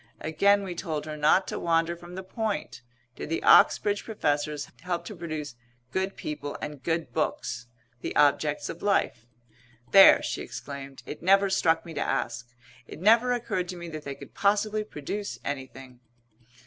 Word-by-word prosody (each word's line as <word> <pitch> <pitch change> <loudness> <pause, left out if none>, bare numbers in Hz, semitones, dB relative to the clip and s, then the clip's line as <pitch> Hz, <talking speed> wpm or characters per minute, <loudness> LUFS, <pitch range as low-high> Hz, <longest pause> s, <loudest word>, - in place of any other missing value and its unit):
Again 200 +6 +3
we 185 -2 -4
told 160 -4 -4
her 155 -1 -5
not 150 +5 +3
to - - -4
wander 165 0 +1
from 175 +1 -11
the 190 - -6
point, 215 +2 -4 0.3
did - - -7
the 165 - -2
Oxbridge 205 -1 +5
professors 150 -8 -1
help 175 0 -3
to - - -7
produce 155 -5 -5 0.4
good 190 +3 -1
people 145 -1 -5
and 150 -2 -6
good 165 +1 -2
books? 120 -6 -2 0.3
the - - -4
objects 150 +1 +2
of 165 - -7
life. 120 - 0 0.6
"There!" 195 -1 +8
she - - -3
exclaimed. 140 -1 -8
"It 150 - -8
never 195 +2 +4
struck 165 -4 +2
me 165 - -8
to - - -3
ask. 125 -2 -2 0.4
It - - -10
never 230 +6 +5
occurred 225 -7 -1
to 180 - -5
me 170 -1 -7
that 155 -2 -7
they 140 -1 -5
could - - -13
possibly 210 +1 +1
produce 205 +2 -5
anything." 130 -2 -6
165 Hz, 165 wpm, -27 LUFS, 145-195 Hz, 0.6 s, There